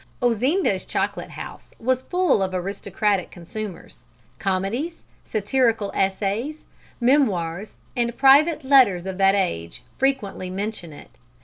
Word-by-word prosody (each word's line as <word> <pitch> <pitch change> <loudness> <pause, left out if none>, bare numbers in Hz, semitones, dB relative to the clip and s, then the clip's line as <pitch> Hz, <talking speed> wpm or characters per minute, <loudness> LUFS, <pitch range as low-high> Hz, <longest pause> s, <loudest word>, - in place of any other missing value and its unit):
Ozinda's 250 - +1
chocolate - - -2
house - - -10
was 255 +2 +1
full 360 - +1
of 190 -1 -1
aristocratic 200 +1 -1
consumers. 190 +1 -8 0.4
Comedies, 205 - -2 0.2
satirical 220 -1 +1
essays, 205 +10 -1 0.3
memoirs 210 - +1 0.2
and 235 -1 -1
private 285 +4 +5
letters 255 -10 +5
of 190 0 -5
that 195 0 +5
age 85 - -2 0.2
frequently 255 -9 -1
mention 195 -3 -4
it. 145 - -13
210 Hz, 110 wpm, -23 LUFS, 190-260 Hz, 0.4 s, private